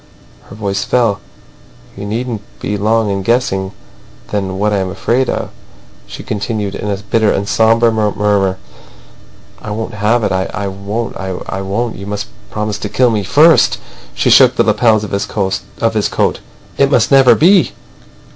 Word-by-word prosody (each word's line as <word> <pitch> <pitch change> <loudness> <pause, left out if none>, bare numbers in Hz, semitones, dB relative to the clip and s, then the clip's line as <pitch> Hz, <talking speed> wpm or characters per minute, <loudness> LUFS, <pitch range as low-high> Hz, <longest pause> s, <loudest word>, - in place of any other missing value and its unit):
Her - - -12
voice 100 -2 -2
fell. 115 -5 +1 0.8
"You 100 +1 -7
needn't 115 0 -3 0.2
be 105 - -3
long 110 +1 +1
in 100 0 -2
guessing 95 -3 0 0.6
then 95 -2 -2
what 105 +1 0
I - - +2
am 95 -1 -2
afraid 120 +7 0
of," - - -3 0.6
she - - -9
continued, 105 -1 -3
in 105 - -4
a 100 - -1
bitter 105 +2 +1
and 100 +1 -1
sombre 115 +2 +3
murmur. 105 -3 0 1.0
"I - - -7
won't 110 +1 -4
have 105 +3 +1
it. - - 0
I 95 0 0 0.2
won't. 100 +4 -4
I 95 0 -4
won't. - - -7
I 95 - -3
won't. 110 +5 -3
You 100 +1 -8
must 105 0 -3 0.2
promise 105 -1 -3
to - - -4
kill 125 -2 +2
me 110 -2 0
first!" 155 - +4 0.4
She - - +1
shook - - +6
the - - +3
lapels 110 -3 +2
of 105 - -6
his 100 - -1 0.8
coat. - - 0 0.4
"It 140 - +4
must 125 -5 +2
never 135 -2 +6
be!" 180 +3 +4
105 Hz, 165 wpm, -15 LUFS, 100-115 Hz, 1.0 s, shook